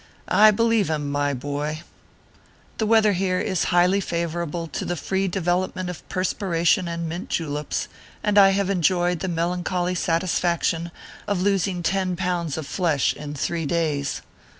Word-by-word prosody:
I 215 +1 +6
helieve 230 -1 +2
him, 145 -2 -2
my 145 0 0
boy! 145 +4 -4 1.0
The 220 - +1
weather 215 -2 +4
here 185 0 0
is 185 - 0
highly 180 +2 +3
favorable 170 -1 -3
to - - -4
the 175 - -2
free 190 +3 -1
development 180 0 -1
of 175 - -12
perspiration 180 0 +1
and 170 0 -3
mint 170 +3 -5
juleps, 150 -2 -2 0.4
and 210 -1 +1
I 200 -1 +8
have 195 0 +1
enjoyed 175 -1 +1
the 190 - -3
melancholy 175 +1 -1
satisfaction 170 -1 0 0.4
of 195 -3 0
losing 195 -2 0
ten 185 0 0
pounds 175 -4 -2
of 160 - -4
flesh 160 -4 +1
in 150 0 -7
three 165 +2 -2
days. 150 -4 -1
175 Hz, 150 wpm, -23 LUFS, 165-190 Hz, 1.0 s, I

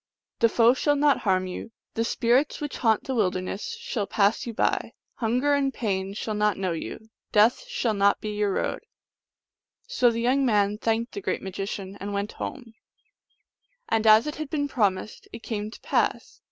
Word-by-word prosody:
The 230 - +5
foe 235 +1 +5
shall 290 +2 +1
not 285 0 +3
harm 185 -2 +1
you; 185 +4 -7 0.2
the 230 - 0
spirits 245 +4 +1
which 295 -1 -5
haunt 225 -3 +2
the 265 - -3
wilderness 195 - -2
shall 235 - -3
pass 205 +3 +1
you - - -2
by; - - 0 0.2
hunger 250 +5 +1
and 275 -1 +2
pain 195 -5 -2
shall 215 +1 -3
not 210 -1 +1
know 190 -2 -1
you; 220 +6 -6 0.2
death 225 - +4
shall 365 - -1
not 200 0 +3
be 215 - -5
in 210 - -4
your 205 -1 +2
road." - - -1 1.1
So - - +3
the 230 0 -2
young 260 +3 +2
man 210 -4 +2
thanked 230 +1 0
the 405 - -6
great - - -2
magician, 195 0 -5
and 200 +1 -5
went 200 +2 -2
home; 240 -5 -7 1.2
and 225 0 +1
as 215 +2 +7
it 300 - -4
had 310 -2 -5
been 285 -1 -1
promised 210 -6 -1
it 230 - -9
came 210 -2 -3
to 220 - -12
pass. - - -1
225 Hz, 185 wpm, -26 LUFS, 205-260 Hz, 1.2 s, as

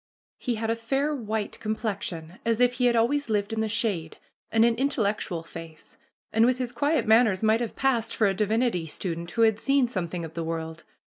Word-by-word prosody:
He 245 -3 -1
had 225 +1 -1
a - - +1
fair 270 +6 -1
white 220 -5 -3
complexion 195 -6 -4
as 230 0 +1
if 245 0 +4
he 250 0 0
had 240 -1 +4
always 240 +4 +1
lived 205 0 0
in 220 - -1
the 220 - -1
shade, 200 -7 -1 0.3
and 225 0 +5
an 235 - +4
intellectual 210 - -1
face, 165 -1 -10 0.4
and 225 - +4
with 250 +1 +3
his 250 -2 -2
quiet 285 +6 +1
manners 220 -3 +4
might 220 +2 +3
have 235 - -3
passed 250 -4 +1
for 220 - +2
a 195 - +3
divinity 215 -3 0
student 170 +1 -4
who 230 - +1
had 220 -1 +3
seen 275 0 +3
something 175 -6 -3
of 160 - -10
the 165 - -3
world. 160 0 -5
220 Hz, 205 wpm, -26 LUFS, 185-240 Hz, 0.4 s, and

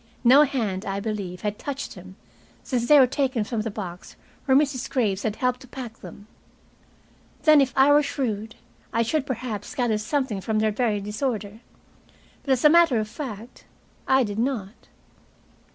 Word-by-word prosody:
No 260 +4 +7
hand, 225 -10 0
I 195 -1 -3
believe, 200 -4 -5
had 210 0 -3
touched 280 -1 -5
them 185 -1 -12 0.5
since 240 -4 -2
they 300 - +7
were 265 - +8
taken 260 -3 -1
from 220 +1 -3
the 225 - -3
box 185 -4 -8 0.3
where 265 -2 +4
Mrs. 275 -3 0
Graves 205 -7 0
had 215 -1 -2
helped 250 +1 -1
to 260 - -14
pack 245 -3 -8
them. 205 - -12 1.2
Then, 305 -2 +7
if 265 -2 +1
I 270 +2 +6
were 295 +1 +6
shrewd, 225 -7 -3 0.4
I 230 +1 +1
should 280 +4 -1
perhaps 235 -1 -5
gather 240 -6 0
something 230 -2 -2
from 220 +2 -1
their 215 0 +2
very 210 -2 0
disorder, 210 0 -3 0.8
But, 270 - +1
as 255 +2 0
a - - +11
matter 330 -6 +5
of 215 - -2
fact, 235 -2 -8 0.4
I 265 0 +4
did 205 -1 -4
not. 230 -5 -3
235 Hz, 170 wpm, -24 LUFS, 210-265 Hz, 1.2 s, a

